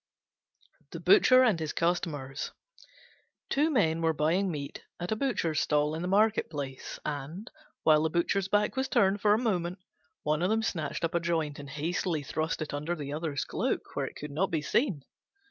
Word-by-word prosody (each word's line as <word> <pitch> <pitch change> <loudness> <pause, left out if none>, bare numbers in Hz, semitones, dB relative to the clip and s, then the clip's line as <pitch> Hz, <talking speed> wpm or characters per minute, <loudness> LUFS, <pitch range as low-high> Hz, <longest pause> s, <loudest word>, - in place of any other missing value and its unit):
THE - - -5
BUTCHER 260 -11 +6
AND 215 -9 +3
HIS 155 -2 -3
CUSTOMERS 150 -6 -2 1.0
Two 295 +3 +3
Men 165 - +2
were 165 -1 +2
buying 165 +6 +1
meat 145 -4 -5 0.2
at 175 +3 -4
a - - +2
Butcher's 215 - 0
stall 150 0 +1
in 160 - -3
the 180 - -2
market 210 +3 +3
place, 140 -4 -6
and, 150 - -5 0.3
while 155 -1 +5
the 160 - +1
Butcher's 175 +4 +1
back 205 +3 +1
was 265 0 0
turned 195 +1 +3
for 210 0 +5
a - - +1
moment, 185 -6 -1 0.5
one 150 +1 +1
of 180 - +2
them 225 +1 +1
snatched 160 -6 -2
up 165 - 0
a 170 - +2
joint 165 -4 -1
and 140 -1 -8
hastily 160 +2 -2
thrust 155 +3 -2
it 150 - -7
under 150 +4 -2
the 145 -3 -5
other's 155 -2 -2
cloak, - - -2
where - - -1
it - - -10
could 150 0 -7
not 175 +6 0
be 160 -3 -1
seen. 180 - +1
165 Hz, 190 wpm, -29 LUFS, 150-195 Hz, 1.0 s, BUTCHER